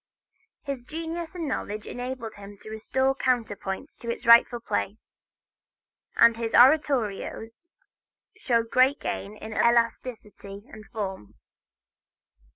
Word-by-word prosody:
His 275 -3 -4
genius 325 +5 -6
and 335 -3 -3
knowledge 215 -5 -4
enabled 245 -2 -6
him 205 0 -12
to 215 - -10
restore 265 +5 0
counterpoint 235 -2 -2
to 235 - -7
its 235 - -4
rightful 235 +1 +6
place, 220 -2 -4 0.9
and 235 - +6
his 230 0 -2
oratorios 245 - +2 0.7
show 235 -2 +1
great 255 +5 +3
gain 205 +2 -5
in 220 0 -8
elasticity 230 -4 -1
and 215 -1 -12
form. 195 - -6
235 Hz, 110 wpm, -26 LUFS, 215-260 Hz, 0.9 s, rightful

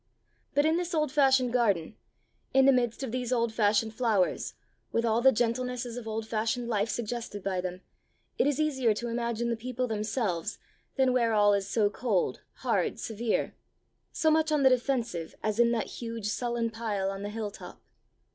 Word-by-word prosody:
But 290 +1 +4
in 320 +1 +3
this 350 0 -2
old 305 -3 +1
fashioned 265 -4 +3
garden, 205 -8 +1 0.6
in 270 0 +6
the 275 - +7
midst 245 -1 0
of 260 - -3
these 250 0 -3
old 235 -2 +1
fashioned 220 0 +2
flowers, 220 -6 0 0.4
with 230 - +1
all 225 +1 +2
the 265 +2 +7
gentlenesses 245 0 -1
of 245 -2 -7
old 220 0 -3
fashioned 225 +2 -1
life 215 -1 0
suggested 230 -3 -4
by 190 -2 -1
them, 180 0 -5 0.6
it - - +4
is 290 0 0
easier 265 -8 +2
to 235 +3 -4
imagine 235 0 -1
the - - +1
people 250 +2 -3
themselves 215 -5 -2 0.4
than 260 -2 +3
where 235 -3 +2
all 205 -1 +5
is 200 -1 -1
so 215 -1 +3
cold, 210 -5 0 0.2
hard, - - +1
severe 225 0 -1 0.6
so 315 - +2
much 315 0 +2
on 300 -2 +2
the 265 - +7
defensive, 240 -10 -1
as 215 +1 -1
in 235 0 +5
that 225 - 0 0.2
huge, 230 -2 -5
sullen 235 +1 -1
pile 210 -4 -2
on 195 0 -6
the 205 - -4
hilltop." 210 -1 -7
230 Hz, 180 wpm, -29 LUFS, 215-255 Hz, 0.6 s, the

